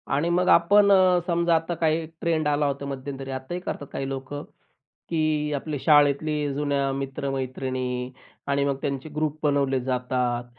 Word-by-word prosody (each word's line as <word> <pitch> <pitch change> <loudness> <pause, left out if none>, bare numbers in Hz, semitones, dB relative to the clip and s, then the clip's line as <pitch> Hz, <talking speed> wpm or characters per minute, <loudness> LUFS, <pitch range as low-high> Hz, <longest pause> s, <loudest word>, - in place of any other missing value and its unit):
आणि 165 +4 +1
मग 180 +1 +2
आपण 200 +4 +6
अ, 185 -2 +5
समजा 170 -1 +2
आता 165 +2 -1
काही 160 0 +1 0.2
ट्रेंड 160 -2 +1
आला 145 0 +2
होता 140 0 -3
मध्यंतरी. 135 0 -6
आताही 130 +7 -4
करतात 145 -5 -5
काही 135 - -3
लोकं 135 +2 -5 0.7
की 155 -2 0
आपले 145 +1 -3
शाळेतली 145 0 +3
जुन्या 140 -1 0
मित्र-मैत्रिणी 130 -2 -3 0.4
आणि 140 0 +1
मग 140 -1 0
त्यांचे 140 +1 -3
ग्रुप 155 0 -1
बनवले 140 -3 +1
जातात 125 -1 -1
145 Hz, 145 wpm, -25 LUFS, 135-155 Hz, 0.7 s, आपण